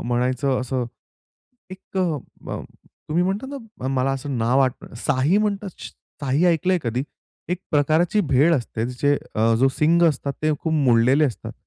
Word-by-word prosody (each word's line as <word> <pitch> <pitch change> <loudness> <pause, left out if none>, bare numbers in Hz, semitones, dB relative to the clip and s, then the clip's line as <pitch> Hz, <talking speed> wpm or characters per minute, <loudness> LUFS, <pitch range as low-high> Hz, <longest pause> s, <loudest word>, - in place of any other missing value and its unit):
म्हणायचं 125 +2 0
असं 130 -1 -2 0.9
एक 190 0 -7 0.5
ब - - -5 0.5
तुम्ही 165 +3 +2
म्हणता 200 +7 -2
ना 220 - -7
मला 135 0 +1
असं 135 -1 -4
नाव 120 +4 +2
आठवत 130 -3 -1
साही 145 +7 +3
म्हणतात, 205 -1 -1 0.5
साही 140 +5 +1
ऐकलंय 180 +2 +2
कधी? 120 +2 -1 0.5
एक 180 - 0
प्रकारची 160 +7 +2
भेड 150 0 +3
असते 115 -3 -2
जे, 145 +3 +1 0.2
अ 115 +1 +3
जो 135 - +5
शिंग 170 +3 +4
असतात 140 -1 -2
ते 155 0 +2
खूप 160 - -2
मोडलेले 130 0 +4
असतात. 125 -7 -4
140 Hz, 150 wpm, -22 LUFS, 130-170 Hz, 0.9 s, जो